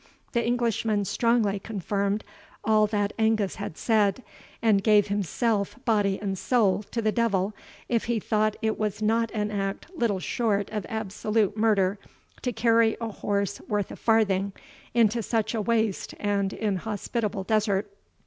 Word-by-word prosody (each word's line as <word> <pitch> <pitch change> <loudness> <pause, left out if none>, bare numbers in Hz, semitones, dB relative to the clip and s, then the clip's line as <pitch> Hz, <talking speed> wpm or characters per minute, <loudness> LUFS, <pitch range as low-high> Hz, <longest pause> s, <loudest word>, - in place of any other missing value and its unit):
The 235 -1 +1
Englishman 230 -3 0
strongly 225 -2 +1
confirmed 200 0 -2 0.4
all 215 -1 +4
that 205 -1 -1
Angus 220 -3 +1
had 160 - -6
said, 215 0 +2 0.4
and 210 -4 +3
gave 210 -2 +4
himself, 205 +2 0
body 205 -4 +2
and 195 -2 -3
soul, 210 -6 +2
to 230 - -2
the 215 - +2
devil, 210 -4 +1 0.3
if 235 -2 0
he 235 -1 0
thought 215 0 +1
it 220 0 0
was 215 0 -2
not 230 +1 +2
an 210 0 -1
act 200 - -4
little 225 - 0
short 205 0 -1
of 210 -3 -3
absolute 215 -1 -1
murder 205 -3 +2 0.4
to 250 - -1
carry 230 0 +3
a 230 -1 -3
horse 200 -1 -2
worth 205 -2 -1
a - - -6
farthing 200 -3 +2 0.4
into 230 0 +3
such 220 0 -1
a 225 - 0
waste 220 -2 0
and 200 -1 0
inhospitable 210 0 -2
desert. 205 -1 0
215 Hz, 150 wpm, -26 LUFS, 200-225 Hz, 0.4 s, all